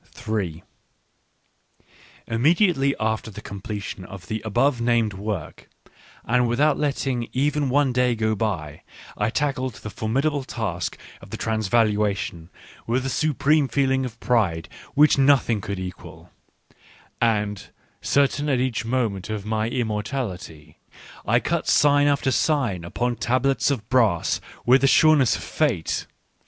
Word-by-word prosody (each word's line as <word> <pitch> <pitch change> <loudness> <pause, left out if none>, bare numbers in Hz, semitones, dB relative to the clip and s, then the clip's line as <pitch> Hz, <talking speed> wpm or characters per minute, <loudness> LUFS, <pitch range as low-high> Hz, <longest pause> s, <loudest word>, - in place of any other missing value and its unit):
Immediately 140 - +2
after 110 +1 -1
the 100 - -9
completion 100 -1 -6
of 95 0 -10
the 110 0 -3
above 120 +4 +1
named 115 -3 +2
work, 100 -4 -6 0.6
and 125 +1 +2
without 145 +6 +2
letting 135 -4 -1
even 145 +1 0
one 135 -1 +2
day 125 -1 +2
go 110 0 0
by, 90 -9 -3 0.3
I 105 +1 0
tackled 130 -1 -1
the 105 - -8
formidable 135 +7 -1
task 105 -9 -4 0.2
of - - -13
the - - -6
Transvalua 105 -2 +1
tion 85 -2 -6 0.4
with 125 +3 0
a - - -1
supreme 150 0 +2
feeling 135 -1 +1
of 115 -3 -6
pride 95 -10 +1 0.3
which 145 -1 +5
nothing 135 -6 +3
could 100 +1 -4
equal; 90 -1 -9 0.9
and, 105 -3 0 0.3
certain 145 +1 +1
at 130 -3 +2
each 125 -3 -1
moment 115 -5 -2
of 105 -2 -4
my 110 +1 -1
immortality, 105 - -4 0.5
I - - +4
cut - - -2
sign 145 0 +4
after 140 -2 +1
sign 130 - 0
upon 120 +8 -2
tablets 130 +4 +1
of 120 -7 -2
brass 115 -10 +2 0.2
with 125 +2 +5
the 135 - +4
sureness 150 -3 +5
of - - -6
Fate. 125 - -1
120 Hz, 130 wpm, -23 LUFS, 105-135 Hz, 0.9 s, which